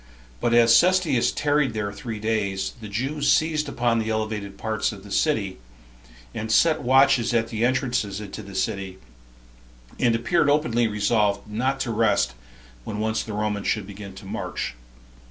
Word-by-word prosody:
But 120 - +1
as 115 -1 +6
Cestius 180 -9 +3
tarried 145 -4 +1
there 100 -1 -2
three 110 +2 -6
days, 100 -3 -1
the 110 - -7
Jews 135 +8 0
seized 155 -2 +1
upon 120 -3 +1
the 110 0 -2
elevated 110 -2 -3
parts 110 -1 -1
of 100 -3 -11
the 100 - -12
city, 100 - 0 0.7
and 110 0 -4
set 160 +6 +4
watches 130 -2 +4
at 115 -1 +1
the 115 -1 -2
entrances 125 -6 0
into 105 -2 -7
the 100 - -11
city, 95 -1 -2 1.0
and 120 -2 +3
appeared 145 +7 +2
openly 120 -6 +2
resolved 105 -1 +1
not 130 +6 -1
to 120 - -1
rest 105 - +2 0.5
when 105 - -5
once 110 +1 0
the 110 - -7
Romans 105 -1 -2
should 105 -3 0
begin 100 -1 -10
to 95 - -11
march. 95 - -4
110 Hz, 160 wpm, -24 LUFS, 105-130 Hz, 1.0 s, as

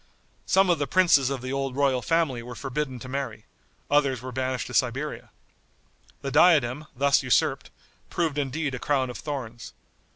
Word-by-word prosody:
Some 190 -1 +4
of 170 - +1
the 145 - -1
princes 165 -8 +4
of 135 -3 -4
the 130 +1 -4
old 135 -1 -2
royal 135 -3 +2
family 160 -7 0
were 120 +1 -9
forbidden 135 0 -4
to - - -8
marry; 135 +1 -5 0.4
others 140 -3 +2
were 130 +2 -7
banished 130 0 -2
to - - -9
Siberia. 135 +4 -1 0.9
The 135 - -3
diadem, 150 -3 +4
thus 140 +2 +3
usurped, 125 -5 +1 0.4
proved 160 -4 -1
indeed 140 +1 -2
a 125 - -4
crown 130 -3 0
of - - -9
thorns. 120 -6 -6
135 Hz, 165 wpm, -26 LUFS, 130-145 Hz, 0.9 s, Some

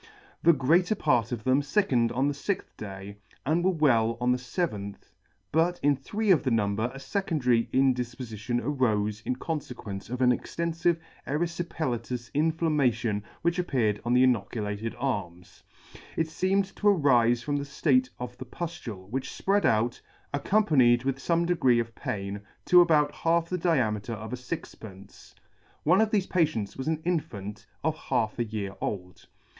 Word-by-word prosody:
The 170 - +6
greater 170 +8 +3
part 120 - +1
of 115 -3 -4
them 130 +3 +3
lickened 125 - +3
on 135 +2 +1
the 145 - 0
fixth 185 +8 -3
day, 100 -1 -8 0.3
and 160 +5 +1
were 185 - +4
well 120 -10 +2
on 125 0 +2
the 125 - +1
feventh, 125 - -4 0.4
but 170 +3 +2
in 145 0 +4
three 205 +10 -1
of 170 - +5
the 130 - 0
number 110 -2 +1
a 135 - -10
fecondary 135 - 0
indifpofition 120 -3 0
arofe 110 -7 0
in 125 - 0
confe 150 +1 -4
quence 100 -3 -7
of 125 +1 -4
an 125 - +6
extenfive 170 +5 0 0.3
eryfipelatous 145 -7 -3
inflammation 150 -9 +1 0.2
which 170 +2 +1
ap 180 - -1
peared 110 -6 +1
on 120 +1 +1
the 125 - +6
inoculated 110 -2 -1
arms. 100 -9 -4 0.6
It 160 0 0
feemed 195 +2 0
to 210 - 0
arife 125 - +4
from 145 -1 -1
the 140 - -2
ftate 135 -2 +2
of 125 0 -6
the 130 - -6
puftule, 125 - -6
which 130 +1 -2
fpread 200 +1 +1
out, 115 +2 +1 0.3
accompanied 140 - +3
with 135 0 -1
fome 170 +3 +1
degree 165 -9 +3
of 115 0 -3
pain, 100 -1 -4 0.2
to 180 0 +7
about 150 -4 +4
half 165 0 +1
the 180 - -1
diameter 115 - 0
of 110 +2 -7
a - - 0
fixpence. 110 - -9 0.5
One 180 +7 +4
of 220 - +2
thefe 205 -3 +1
patients 155 - 0
was 130 - -5
an 160 -1 -1
infant 105 - -3 0.2
of 160 -1 +1
half 120 -7 -1
a - - +3
year 105 -3 -4
old. 90 -3 -5
130 Hz, 160 wpm, -27 LUFS, 115-165 Hz, 0.6 s, to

